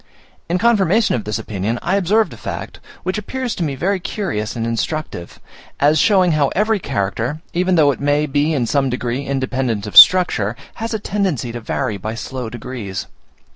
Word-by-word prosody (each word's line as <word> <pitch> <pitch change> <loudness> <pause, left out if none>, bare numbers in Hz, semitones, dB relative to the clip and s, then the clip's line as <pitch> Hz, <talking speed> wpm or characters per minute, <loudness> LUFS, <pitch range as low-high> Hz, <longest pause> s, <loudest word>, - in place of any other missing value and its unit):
In 175 - +1
confirmation 215 -1 +3
of 115 - -2
this 105 +1 -2
opinion, 110 +1 -3
I 185 +3 +1
observed 200 +1 +2
a - - -9
fact, - - -7 0.2
which 185 +3 -2
appears 255 +2 -4
to 175 - -3
me 145 -4 -2
very 185 +8 0
curious 170 - -3
and 115 -1 -2
instructive, 115 - -4 0.4
as 150 +2 +4
showing 190 -3 +4
how 150 -3 +2
every 215 +1 +2
character, 120 - -2
even 180 +1 +1
though 150 -4 +5
it 135 - -6
may 145 +1 +2
be 145 +2 +1
in 135 -6 0
some 135 +2 +1
degree 125 +1 -2
independent 130 -5 -2
of 105 - -8
structure, 120 - +7 0.3
has 225 0 -2
a - - -2
tendency 190 - -2
to 120 - -5
vary 115 -1 -2
by 110 +4 -5
slow 125 +1 -5
degrees. 120 -4 -6
140 Hz, 180 wpm, -19 LUFS, 115-185 Hz, 0.4 s, structure